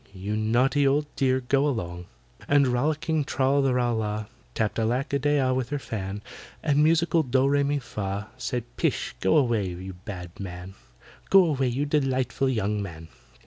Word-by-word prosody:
You 100 Hz, +3 st, -3 dB
naughty 125 Hz, +6 st, +2 dB
old 145 Hz, +2 st, +2 dB
dear, 130 Hz, -1 st, +2 dB
go 135 Hz, +3 st, +2 dB
along!" 90 Hz, -9 st, -3 dB, 0.4 s
And 145 Hz, -1 st, +4 dB
rollicking 150 Hz, +5 st, 0 dB
TRAL 140 Hz, -1 st, +1 dB
THE 135 Hz, -2 st, +2 dB
RAL 120 Hz, -2 st, +1 dB
LAH 105 Hz, 0 st, -2 dB, 0.3 s
Tapped 110 Hz, 0 st, 0 dB
ALACK 120 Hz, +5 st, 0 dB
A 140 Hz, -, +2 dB
DEY 145 Hz, +2 st, +2 dB
AH 130 Hz, -1 st, +2 dB
with 130 Hz, -1 st, -1 dB
her 145 Hz, -, -1 dB
fan; 105 Hz, -5 st, -5 dB, 0.4 s
And 150 Hz, -1 st, +3 dB
musical 165 Hz, +1 st, +3 dB
DOH 130 Hz, -1 st, +2 dB
REH 140 Hz, +1 st, +3 dB
MI 145 Hz, +1 st, +1 dB
FAH 100 Hz, -5 st, -4 dB
Said, 125 Hz, -3 st, -3 dB
"Pish, -, -, 0 dB
go 95 Hz, -, +3 dB
away, 120 Hz, -8 st, +2 dB
you 90 Hz, +2 st, -6 dB
bad 90 Hz, -1 st, -8 dB
man! 90 Hz, -1 st, -7 dB, 0.6 s
Go 195 Hz, -2 st, +7 dB
away, 135 Hz, -5 st, +1 dB
you 130 Hz, +4 st, -1 dB
delightful 135 Hz, -3 st, 0 dB
young 105 Hz, -4 st, 0 dB
man!" 80 Hz, -4 st, -8 dB
125 Hz, 175 wpm, -26 LUFS, 105-140 Hz, 0.6 s, Go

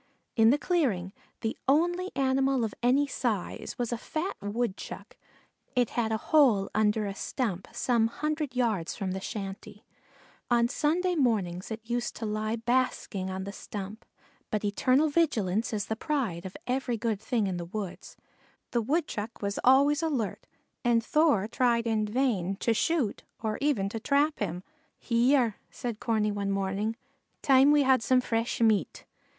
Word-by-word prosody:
In 225 Hz, -1 st, +6 dB
the 275 Hz, -, +4 dB
clearing, 240 Hz, -, 0 dB, 0.3 s
the 225 Hz, -, -2 dB
only 350 Hz, +6 st, +2 dB
animal 270 Hz, -1 st, +2 dB
of 220 Hz, -, -2 dB
any 260 Hz, +4 st, +4 dB
size 235 Hz, -8 st, -3 dB
was 240 Hz, -1 st, -2 dB
a 235 Hz, -, -3 dB
fat 325 Hz, -, -3 dB
Woodchuck; 205 Hz, 0 st, -4 dB, 0.6 s
it 245 Hz, -3 st, +2 dB
had 225 Hz, -2 st, 0 dB
a 220 Hz, -, +1 dB
hole 230 Hz, -7 st, +3 dB
under 215 Hz, 0 st, +2 dB
a 200 Hz, -, -3 dB
stump 200 Hz, -3 st, -3 dB
some 235 Hz, -3 st, +2 dB
hundred 300 Hz, +1 st, -3 dB
yards 220 Hz, -9 st, 0 dB
from 190 Hz, -2 st, -3 dB
the 190 Hz, -, -3 dB
shanty. 200 Hz, 0 st, -7 dB, 0.6 s
On 235 Hz, -1 st, +4 dB
sunny 340 Hz, +7 st, +1 dB
mornings 200 Hz, -, 0 dB
it 220 Hz, 0 st, -7 dB
used 240 Hz, 0 st, -2 dB
to 225 Hz, -, -5 dB
lie 215 Hz, +1 st, -1 dB
basking 230 Hz, -5 st, -1 dB
on 190 Hz, 0 st, -4 dB
the 200 Hz, -, -5 dB
stump, 205 Hz, +1 st, -7 dB, 0.5 s
but 210 Hz, -1 st, -1 dB
eternal 255 Hz, +8 st, +3 dB
vigilance 230 Hz, -, +1 dB
is 210 Hz, -2 st, -2 dB
the 220 Hz, -, -2 dB
price 230 Hz, -, -2 dB
of 190 Hz, -, -7 dB
every 250 Hz, -1 st, -1 dB
good 220 Hz, -2 st, -1 dB
thing 225 Hz, -2 st, 0 dB
in 185 Hz, -2 st, -2 dB
the 170 Hz, -, -4 dB
woods. 195 Hz, +1 st, -6 dB, 0.5 s
The 240 Hz, -, +1 dB
Woodchuck 230 Hz, -6 st, -2 dB
was 200 Hz, 0 st, -1 dB
always 280 Hz, +4 st, +5 dB
alert 270 Hz, -11 st, -2 dB, 0.4 s
and 235 Hz, -2 st, +2 dB
Thor 295 Hz, -11 st, +3 dB
tried 235 Hz, -1 st, +1 dB
in 220 Hz, -2 st, +1 dB
vain 210 Hz, -6 st, 0 dB
to 230 Hz, +3 st, +1 dB
shoot 280 Hz, -3 st, 0 dB, 0.2 s
or 215 Hz, -1 st, -1 dB
even 275 Hz, -10 st, +1 dB
to 225 Hz, -, -4 dB
trap 285 Hz, +5 st, +1 dB
him. 180 Hz, -3 st, -3 dB, 0.4 s
"Hyar," 240 Hz, -1 st, +2 dB
said 235 Hz, -3 st, -5 dB
Corney 215 Hz, -3 st, +1 dB
one 200 Hz, -1 st, -2 dB
morning, 195 Hz, +3 st, -1 dB, 0.5 s
"time 270 Hz, +1 st, +6 dB
we 295 Hz, -1 st, +5 dB
had 260 Hz, -2 st, +4 dB
some 255 Hz, +3 st, +3 dB
fresh 230 Hz, 0 st, -1 dB
meat." 220 Hz, -3 st, +1 dB
230 Hz, 160 wpm, -28 LUFS, 205-265 Hz, 0.6 s, In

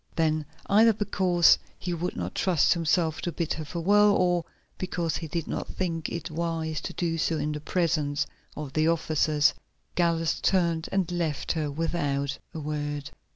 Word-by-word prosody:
Then, 155 Hz, -2 st, +1 dB, 0.2 s
either 220 Hz, +3 st, +5 dB
because 185 Hz, -4 st, +4 dB, 0.2 s
he 175 Hz, -, -3 dB
would 175 Hz, +2 st, -3 dB
not 90 Hz, 0 st, -4 dB
trust 180 Hz, -6 st, +3 dB
himself 165 Hz, -1 st, +1 dB
to 175 Hz, -, -2 dB
bid 170 Hz, -1 st, -2 dB
her 155 Hz, -, -5 dB
farewell, 200 Hz, +6 st, +4 dB
or 175 Hz, -2 st, +2 dB, 0.3 s
because 175 Hz, -3 st, -1 dB
he 160 Hz, -, -5 dB
did 165 Hz, +1 st, -3 dB
not -, -, -3 dB
think 165 Hz, -4 st, -3 dB
it 170 Hz, -2 st, -5 dB
wise 160 Hz, -1 st, -2 dB
to -, -, -5 dB
do 165 Hz, -2 st, -1 dB
so 160 Hz, 0 st, +1 dB
in 150 Hz, 0 st, -1 dB
the 150 Hz, 0 st, -4 dB
presence 150 Hz, -4 st, 0 dB, 0.3 s
of 145 Hz, -3 st, -6 dB
the 155 Hz, 0 st, +2 dB
officers, 155 Hz, -2 st, +2 dB, 0.4 s
Gallus 165 Hz, -2 st, +1 dB
turned 170 Hz, -4 st, +1 dB
and 190 Hz, -3 st, 0 dB
left 165 Hz, -5 st, -1 dB
her 155 Hz, -3 st, -1 dB
without 140 Hz, -3 st, -1 dB
a 160 Hz, -, -6 dB
word. 145 Hz, -1 st, -3 dB
165 Hz, 165 wpm, -27 LUFS, 150-175 Hz, 0.4 s, either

